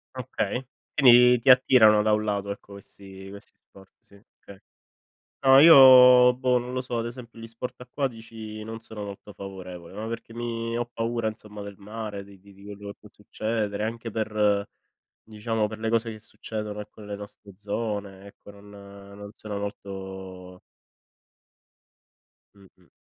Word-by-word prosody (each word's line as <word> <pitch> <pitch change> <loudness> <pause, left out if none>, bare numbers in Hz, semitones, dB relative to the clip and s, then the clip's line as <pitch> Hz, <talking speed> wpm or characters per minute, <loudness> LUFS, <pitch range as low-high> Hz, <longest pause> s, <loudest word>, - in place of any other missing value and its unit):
Okay. 125 -1 -3 0.3
Quindi 125 -3 +6
ti 130 - 0
attirano 125 -4 +6
da 110 0 +2
un 105 - +1
lato 100 -1 -2
ecco 100 0 -10
questi 95 -1 -13
questi 100 +1 -12
sport, 95 -1 -20
sì. 100 - -22 0.3
Okay. 100 - -14 0.9
No 135 0 +7
io 125 -5 +9
boh 125 0 +1
non 125 +1 -7
lo 130 - -2
so, 125 -2 -4
ad 115 - -2
esempio 120 -1 -10
gli 115 - -8
sport 115 +3 -8
acquatici 115 -4 -6
non 115 +1 -8
sono 110 -2 -9
molto 100 +1 -10
favorevole, 95 -3 -10
ma 110 +2 -6
perché 115 0 -7
mi 115 -1 -4
ho 120 - -1
paura 115 -1 -2
insomma 105 -1 -9
del 100 -1 -9
mare, 105 -1 -7
di 100 -1 -17
di 100 +1 -18
di 100 +1 -18
quello 100 0 -9
che - - -11
può 105 - -16
succedere, 105 0 -3
anche 115 +1 -5
per 105 -2 0 0.6
diciamo 110 0 -2
per 110 0 -9
le 110 0 -2
cose 115 0 0
che 110 - -10
succedono 105 -1 -7
ecco 105 +1 -11
nelle 105 -1 -6
nostre 100 0 -12
zone 100 -1 -5
ecco, 100 - -15
non 100 0 -16
non 100 0 -12
sono 105 -2 -7
molto 95 -2 -8 2.0
Mh-mh. 95 -2 -23
105 Hz, 160 wpm, -25 LUFS, 100-115 Hz, 2.0 s, io